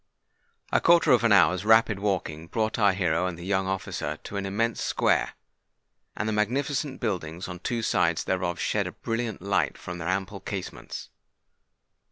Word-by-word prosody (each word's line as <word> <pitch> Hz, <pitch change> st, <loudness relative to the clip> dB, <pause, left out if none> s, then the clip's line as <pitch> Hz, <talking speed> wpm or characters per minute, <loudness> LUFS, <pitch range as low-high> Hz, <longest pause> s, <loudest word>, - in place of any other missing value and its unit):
A -, -, +3 dB
quarter 170 Hz, 0 st, +5 dB
of 120 Hz, -2 st, +5 dB
an 115 Hz, -, +4 dB
hour's 90 Hz, -1 st, +5 dB
rapid 110 Hz, -1 st, +4 dB
walking 85 Hz, -6 st, -2 dB
brought 110 Hz, +4 st, -1 dB
our 100 Hz, -2 st, +5 dB
hero 90 Hz, -2 st, +1 dB
and 90 Hz, -2 st, -5 dB
the 85 Hz, -, -8 dB
young 95 Hz, -1 st, 0 dB
officer 95 Hz, 0 st, -3 dB
to -, -, -8 dB
an 100 Hz, 0 st, -2 dB
immense 115 Hz, +4 st, -1 dB
square; -, -, +1 dB, 0.8 s
and 110 Hz, -, -1 dB
the 110 Hz, -, 0 dB
magnificent 135 Hz, +6 st, -1 dB
buildings 90 Hz, -6 st, -3 dB
on 90 Hz, -1 st, -7 dB
two 115 Hz, +4 st, -2 dB
sides 85 Hz, -5 st, +2 dB
thereof 90 Hz, -2 st, -1 dB
shed -, -, 0 dB
a -, -, -5 dB
brilliant 115 Hz, -4 st, -3 dB
light 85 Hz, -8 st, 0 dB
from 90 Hz, 0 st, -7 dB
their 85 Hz, -, -4 dB
ample 95 Hz, +1 st, -2 dB
casements. 95 Hz, -2 st, -6 dB
100 Hz, 170 wpm, -27 LUFS, 90-110 Hz, 0.8 s, quarter